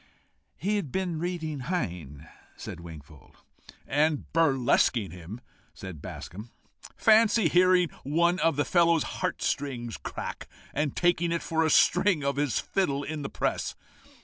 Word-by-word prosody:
"He 210 +3 0
had 165 -10 -4
been 180 -4 -2
reading 160 -4 -3
Heine," 85 - -4 0.3
said - - -7
Wingfold. 75 -4 -13 0.5
"And 150 0 +1
burlesquing 130 - +2
him," 90 +7 -9 0.4
returned 95 -6 -8
Bascombe. 105 +7 -8 0.5
"Fancy 225 0 +5
hearing 180 -1 +4
one 170 +6 +2
of 165 -3 +2
the 145 0 +1
fellow's 170 0 +3
heart - - -3
strings 120 -5 -2
crack, - - -6 0.3
and 145 -1 -1
taking 175 -1 +2
it 170 - -1
for 160 0 0
a 160 - +2
string 180 -1 +4
of 140 0 -1
his 145 -3 0
fiddle 145 -8 -1
in 155 +1 -4
the 140 - -4
press! - - -2
150 Hz, 140 wpm, -27 LUFS, 120-175 Hz, 0.5 s, Fancy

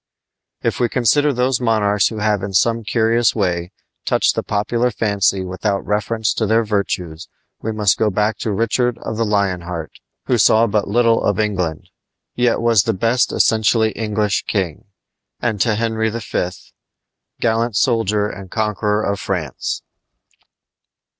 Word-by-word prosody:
If - - -1
we 120 -1 +2
consider 140 +5 +2
those 125 -1 0
monarchs 105 -4 +2
who 110 - -5
have 105 -2 0
in 95 0 -5
some 115 +4 +2
curious 115 +1 +2
way 90 -4 -1 0.3
touched - - +2
the - - -1
popular 115 +4 0
fancy 100 -4 0
without 100 +2 -2
reference 105 +2 0
to 110 - -1
their 115 +2 +3
virtues 95 -5 -3 0.3
we 110 - -3
must 105 -2 +1
go 110 - +3
back 105 +2 0
to 110 - -2
Richard 115 +3 0
of 110 - -4
the 115 - 0
Lion 100 -4 0
Heart, 85 -2 -6 0.3
who 125 -2 +1
saw 110 +2 +5
but 105 -2 0
little 115 +2 +2
of 100 0 0
England, 90 -7 -2 0.4
yet 120 -1 +1
was 115 -3 +4
the 115 - +1
best 115 +6 +1
essentially 110 0 +2
English 105 -2 -1
king, 95 -7 -2 0.5
and 110 -5 -1
to 115 -3 +2
Henry 110 0 0
V., 110 -5 -2 0.9
gallant 115 -1 0
soldier 105 -3 +1
and 100 -2 -9
conqueror 105 0 -1
of 100 0 -1
France. 90 -8 -3
110 Hz, 150 wpm, -19 LUFS, 100-115 Hz, 0.9 s, saw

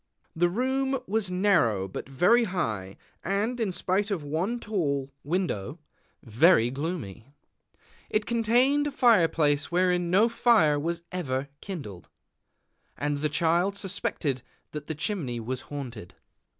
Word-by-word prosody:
The 175 +2 +3
room 265 +6 0
was 210 -1 0
narrow, 170 - +2
but 95 - -7
very 180 - +4
high, 110 - -3 0.3
and, 210 +6 -1
in 220 -5 0
spite 190 +3 -1
of 190 -7 -2
one 170 +11 -2
tall 140 - -2
window, 150 - -2 0.5
very 120 - +4
gloomy. 135 - -5 0.8
It 215 0 0
contained 245 +6 +2
a - - -3
fire 235 -11 +5
place 145 -2 0
wherein 180 -1 +2
no 200 +6 +5
fire 225 -11 +3
was 170 +3 -3
ever 140 -6 -3
kindled; 135 - -8 0.9
and 145 0 -1
the 150 +1 0
Child 170 +5 +1
suspected 165 -9 -2 0.3
that 150 -1 -7
the 160 - -3
chimney 150 - -2
was 125 +3 -3
haunted. 120 -10 -7
170 Hz, 130 wpm, -27 LUFS, 140-205 Hz, 0.9 s, fire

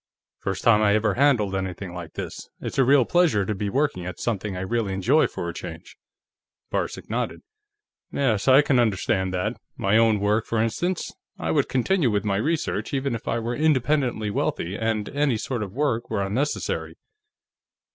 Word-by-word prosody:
First 95 -1 -3
time 110 -2 +5
I 105 -1 +4
ever 105 -1 +2
handled 125 -8 +3
anything 95 -1 -4
like 85 -2 -8
this; - - -7
it's - - -4
a - - +6
real 135 0 +5
pleasure 160 - +3
to 105 - -1
be 100 0 -3
working 135 -6 0
at 90 -1 -6
something 105 -4 -2
I - - -4
really 105 0 -1
enjoy, 125 +11 +3
for - - -5
a - - -4
change." - - -8 0.8
Varcek - - -3
nodded. - - -3 0.7
"Yes, 120 -7 0
I 135 +2 +7
can 135 -4 +3
understand 95 -4 +1
that. 90 - -1 0.2
My 100 +3 +3
own 110 -2 +4
work, 105 +2 +1
for 115 - 0
instance. 165 +11 -1 0.2
I - - -2
would 145 -3 +1
continue 135 +3 +2
with 105 -1 0
my 100 -2 +1
research 155 +3 -1
even 135 -1 -1
if 115 - -6
I - - 0
were 120 +1 -2
independently 135 -7 +1
wealthy 95 -2 -1
and 110 -1 -1
any 145 -4 +1
sort 120 +1 -3
of 100 -3 -4
work 120 -2 -1
were 100 -3 0
unnecessary." 125 +10 -2
115 Hz, 180 wpm, -24 LUFS, 100-135 Hz, 0.8 s, I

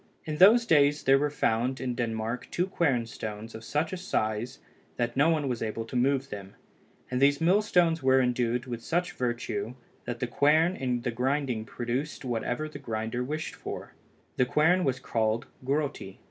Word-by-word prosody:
In 155 -1 -3
those 220 +7 +7
days 145 -5 +4
there 135 +1 +5
were 150 +1 +1
found 130 -2 0
in 130 -1 -2
Denmark 115 0 -3
two 175 - 0
quern 145 -11 +1
stones 110 0 -7
of 110 - -9
such 150 +8 -1
a - - -2
size, 115 - -2 0.4
that 120 -1 -1
no 145 +4 +4
one 155 -4 +1
was 125 -3 -2
able 115 0 -3
to 120 - -9
move 135 +2 +1
them, 100 -1 -8 0.6
and 125 +1 -1
these 140 +1 +4
mill 180 +6 +4
stones 170 -6 +2
were 130 0 +4
endued 125 -1 0
with 120 -2 -5
such 175 +5 0
virtue, 120 -2 -3 0.3
that 120 -1 -4
the 125 - 0
quern 155 +8 +3
in 125 -5 -1
grinding 125 -1 -1
produced 125 +6 -4
whatever 125 +4 -2
the 150 -2 -9
grinder 115 -1 -3
wished 155 +4 -4
for. - - -7 0.4
The 125 - +4
quern 175 +7 +3
was 130 -2 0
called 115 -2 0 0.2
Grotti. 140 +2 -2
130 Hz, 175 wpm, -28 LUFS, 120-150 Hz, 0.6 s, those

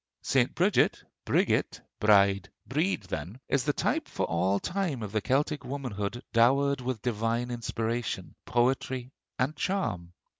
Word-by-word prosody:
St. - - +2
Bridget - - +3 0.2
(Brigit, - - +2 0.2
Bride, 100 -1 +4 0.2
Breed), 155 - 0
then, 90 - -5
is 135 -2 +1
the 145 - +3
type - - 0
for - - -2
all 95 +4 +1
time 175 - -2
of 105 - -5
the 110 0 0
Celtic 145 +5 0
womanhood 120 -4 -4
dowered 135 +4 +4
with 125 -3 -3
divine 115 +1 -1
inspiration, 115 0 -3
poetry, 125 +1 0 0.3
and 135 +5 0
charm. 105 - -2
120 Hz, 135 wpm, -29 LUFS, 105-135 Hz, 0.3 s, Bride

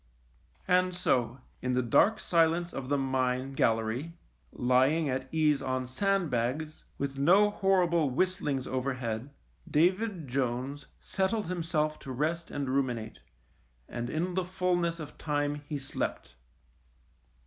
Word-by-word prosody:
ioo - - -35
THE - - -6
MINE 180 0 +6
And 180 -1 -6
so 125 -8 +1 0.2
in 125 0 -1
the 125 0 +2
dark 210 - +4
silence 170 +1 +2
of 135 -1 -5
the 145 - +2
mine 130 0 0
gal 115 -4 +3
lery, 115 +9 -4 0.4
lying 130 +6 +3
at 130 0 -2
ease 155 -3 +2
on 130 -1 -1
sandbags, 155 - -1
with 135 -1 -3
no 195 +8 +5
horrible 180 -6 +2
whistlings 145 -3 0
overhead, 130 -2 -2 0.4
David 185 +1 +1
Jones 130 +2 -2
settled 200 +3 -1
himself 160 -3 -1
to 135 - -8
rest 160 +6 -1
and 140 -1 -3
ruminate, 125 -5 -1 0.7
and 120 0 -4
in 175 +4 -1
the 185 +1 0
fulness 175 -2 0
of 150 -2 -9
time 145 -1 0
he 150 - -3
slept. 135 - -4
145 Hz, 135 wpm, -30 LUFS, 130-170 Hz, 0.7 s, MINE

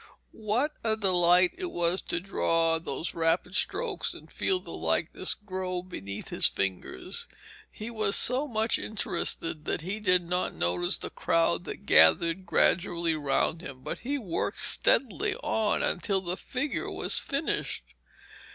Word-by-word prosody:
What 225 +8 -1
a 220 -1 +1
delight 180 -3 +4
it 365 -2 -3
was 175 - 0
to - - -1
draw 165 -3 +1
those 160 +1 -4
rapid 165 +2 0
strokes 485 - -1
and - - -13
feel 375 -1 0
the - - -11
likeness - - 0
grow 185 -3 -4
beneath 100 - -7
his - - +3
fingers! 95 -9 -3 0.4
He 220 +2 -7
was 215 -3 0
so 260 +4 +2
much 220 -2 0
interested 170 -6 -2
that - - -1
he 190 +6 -4
did 180 -4 +3
not 180 +2 -2
notice 90 0 +1
the - - -6
crowd 85 +1 +1
that - - -8
gathered 165 - +5
gradually 170 -1 +2
round 155 +2 0
him, 130 -5 -9
but - - -5
he 280 +4 -2
worked 195 -11 -3
steadily 395 - +3
on 220 - 0
until 190 +1 0
the 180 -1 -3
figure 275 +7 -3
was - - +1
finished. 280 +2 -2
180 Hz, 145 wpm, -28 LUFS, 165-220 Hz, 0.4 s, gathered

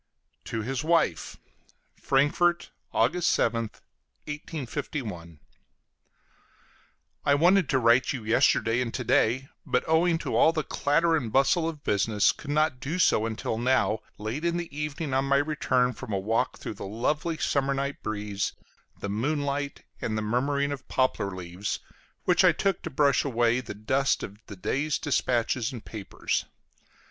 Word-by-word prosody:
TO 110 -1 -4
HIS 135 +5 -2
WIFE 160 - +1 0.6
FRANKFORT, 160 +6 +2 0.2
August 175 -1 +2
7th, 115 -1 -1 0.4
1851. 125 - -5 1.8
I 140 - +4
wanted 175 +1 +4
to 135 - +3
write 120 +1 +4
to - - -1
you 115 - -10
yesterday 115 +1 +3
and 120 -2 -2
to 130 - -2
day, 125 +3 +2
but, 125 - 0
owing 165 +1 +3
to - - -3
all 160 - +5
the 155 -2 -1
clatter 165 +5 +2
and 125 -8 -2
bustle 140 +6 +3
of 155 -3 -9
business, 105 +1 +2
could 145 - -11
not 150 -2 +1
do 145 +8 -3
so 115 -10 +3
until 110 0 -3
now, 120 -3 +2 0.2
late 110 +9 -4
in 170 0 +1
the 170 -4 -6
evening 150 -1 -3
on 135 +1 +2
my 140 0 +3
return 135 -4 +1
from 110 - -8
a 100 - +1
walk 115 +6 0
through - - -6
the - - -9
lovely 150 - -1
summer 140 -2 0
night 140 +1 -3
breeze, 105 -2 -3 0.5
the - - -4
moonlight, 140 +6 -2 0.2
and 110 -1 -2
the 110 - -1
murmuring 140 +6 0
of 135 -2 -6
poplar 130 -6 +1
leaves, 90 +2 -4 0.4
which - - +3
I - - +6
took 195 -2 0
to 170 - -5
brush 140 -1 +3
away 120 -2 +2
the 125 - -8
dust 130 +6 +1
of 100 +1 -8
the 100 - -8
day's 140 +10 -1
dispatches 125 -4 0
and 120 -4 -9
papers. 105 -3 -3
130 Hz, 155 wpm, -27 LUFS, 115-150 Hz, 1.8 s, I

